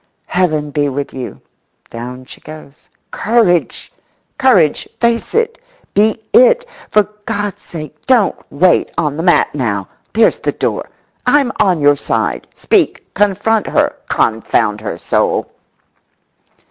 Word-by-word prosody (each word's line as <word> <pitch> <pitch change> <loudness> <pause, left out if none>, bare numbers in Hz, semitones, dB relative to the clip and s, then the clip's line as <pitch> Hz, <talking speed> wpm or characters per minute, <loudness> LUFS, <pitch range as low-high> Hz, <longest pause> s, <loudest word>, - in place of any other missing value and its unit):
Heaven 155 -5 0
be 145 -1 0
with 140 +1 -4
you! 130 -2 -7 0.5
Down 125 +2 -7
she - - -12
goes. 155 0 -13 0.2
Courage, 205 -6 +1 0.5
courage! 195 - +3
Face 235 - 0
it, 460 +1 0 0.3
be 220 +2 +2
it! - - +5 0.2
For 210 - +4 0.2
God's 205 -2 -3
sake 155 - -10
don't 245 -6 +4 0.2
wait 175 +5 +3
on 150 -4 0
the 160 - -3
mat 175 +1 +3
now! 105 -9 -2 0.3
There's 225 +1 +3
the - - -1
door! - - -2 0.4
I'm 280 -4 +3
on 185 -6 +2
your 145 0 +5
side. - - -2
Speak! - - 0
Confront 205 +2 +1
her, - - +1
confound 110 -1 +1
her 110 - -4
soul! - - 0
175 Hz, 125 wpm, -16 LUFS, 145-220 Hz, 0.5 s, it